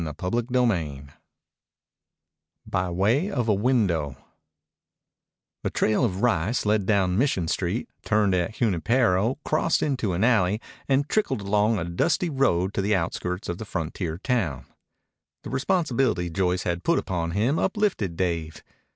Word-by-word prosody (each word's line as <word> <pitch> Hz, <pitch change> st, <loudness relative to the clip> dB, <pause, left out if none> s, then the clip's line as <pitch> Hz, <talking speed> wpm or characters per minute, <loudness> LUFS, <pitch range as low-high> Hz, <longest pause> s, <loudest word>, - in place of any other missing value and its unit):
CHAPTER 90 Hz, +9 st, -2 dB
VI 90 Hz, -, 0 dB, 1.6 s
BY 90 Hz, 0 st, -1 dB
WAY 110 Hz, -, +1 dB
OF 125 Hz, -, -1 dB
A 105 Hz, -, +4 dB
WINDOW 95 Hz, -, +1 dB, 1.5 s
The -, -, -1 dB
trail 110 Hz, +4 st, +1 dB
of 100 Hz, -3 st, -1 dB
rice 115 Hz, +1 st, +1 dB
led 105 Hz, -2 st, +1 dB
down 95 Hz, -2 st, +2 dB
Mission 110 Hz, -, +1 dB
Street, 90 Hz, +8 st, -1 dB, 0.2 s
turned 105 Hz, -3 st, +2 dB
at 90 Hz, +4 st, 0 dB
Junipero, 115 Hz, +2 st, +2 dB
crossed 155 Hz, +2 st, +1 dB
into 130 Hz, -10 st, -1 dB
an 90 Hz, +4 st, 0 dB
alley, 105 Hz, -4 st, +3 dB, 0.3 s
and 140 Hz, +2 st, +2 dB
trickled 210 Hz, -, 0 dB
along 105 Hz, +2 st, +2 dB
a 90 Hz, -, -2 dB
dusty 160 Hz, -, 0 dB
road 100 Hz, -9 st, +1 dB
to -, -, 0 dB
the 105 Hz, +1 st, +2 dB
outskirts 90 Hz, +1 st, -3 dB
of 85 Hz, +2 st, -4 dB
the -, -, -4 dB
frontier 80 Hz, -3 st, -4 dB
town. 90 Hz, -, -1 dB, 0.8 s
The -, -, -7 dB
responsibility 130 Hz, -, 0 dB
Joyce 90 Hz, 0 st, 0 dB
had 85 Hz, 0 st, -2 dB
put 170 Hz, -, +2 dB
upon 85 Hz, -3 st, -2 dB
him 125 Hz, +9 st, +2 dB
uplifted 190 Hz, -, 0 dB
Dave. 85 Hz, -4 st, -2 dB
100 Hz, 140 wpm, -25 LUFS, 90-125 Hz, 1.6 s, A